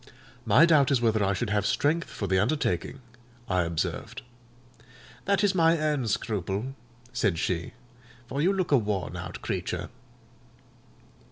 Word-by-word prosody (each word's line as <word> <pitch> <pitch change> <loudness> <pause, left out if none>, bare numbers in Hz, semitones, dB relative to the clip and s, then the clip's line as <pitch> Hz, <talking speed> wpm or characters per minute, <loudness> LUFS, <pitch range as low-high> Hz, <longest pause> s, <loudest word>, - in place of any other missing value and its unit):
"My 125 +10 +7
doubt 150 -5 +4
is 135 - +3
whether 110 -3 +2
I 100 0 +2
should 110 +1 -2
have 105 -1 +1
strength 150 +10 +1
for 100 - -5
the 95 -1 +2
undertaking," 120 - -1 0.5
I 90 -1 +1
observed. 85 -2 -3 1.0
"That 200 0 +2
is 205 -1 +3
my 165 -2 +4
own 150 -5 0
scruple," 105 +3 -2 0.4
said 95 -6 +1
she; 85 0 -2 0.5
"for 135 +4 -3
you 180 +5 +3
look 190 -4 -1
a 140 - +6
worn 100 -4 -3
out - - -7
creature." - - -3
115 Hz, 145 wpm, -27 LUFS, 100-155 Hz, 1.0 s, My